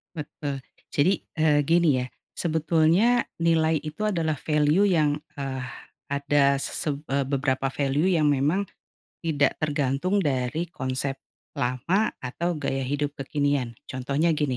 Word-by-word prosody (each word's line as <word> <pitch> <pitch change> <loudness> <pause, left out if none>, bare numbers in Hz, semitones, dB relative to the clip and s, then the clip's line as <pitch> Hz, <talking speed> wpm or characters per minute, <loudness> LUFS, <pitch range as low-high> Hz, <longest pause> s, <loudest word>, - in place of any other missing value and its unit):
Betul 145 -2 -5 0.3
jadi, 170 +7 +4 0.3
eee, 150 -2 +4
gini 170 +1 +4 0.2
ya - - -8 0.3
sebetulnya 165 +8 +3 0.2
nilai 160 -2 +3
itu 155 +8 -4
adalah 165 -7 0
value 150 +7 +2
yang, 155 -6 +3 0.2
eee, 135 -2 -4 0.4
ada 140 -1 +2
seseb 145 0 -2
eee, 140 0 +1
beberapa 135 -1 0
value 140 +4 +1
yang 155 -3 +3
memang, 145 +7 +2 0.6
tidak 150 -4 +2
tergantung 145 +5 0
dari 135 +5 0
konsep 130 +1 -2 0.4
lama 150 - +1
atau 170 +7 -2
gaya 135 -2 -1
hidup 145 +2 -1
kekinian 140 -4 -1
contohnya 140 +6 0
gini, 145 -5 0
145 Hz, 125 wpm, -26 LUFS, 135-160 Hz, 0.6 s, jadi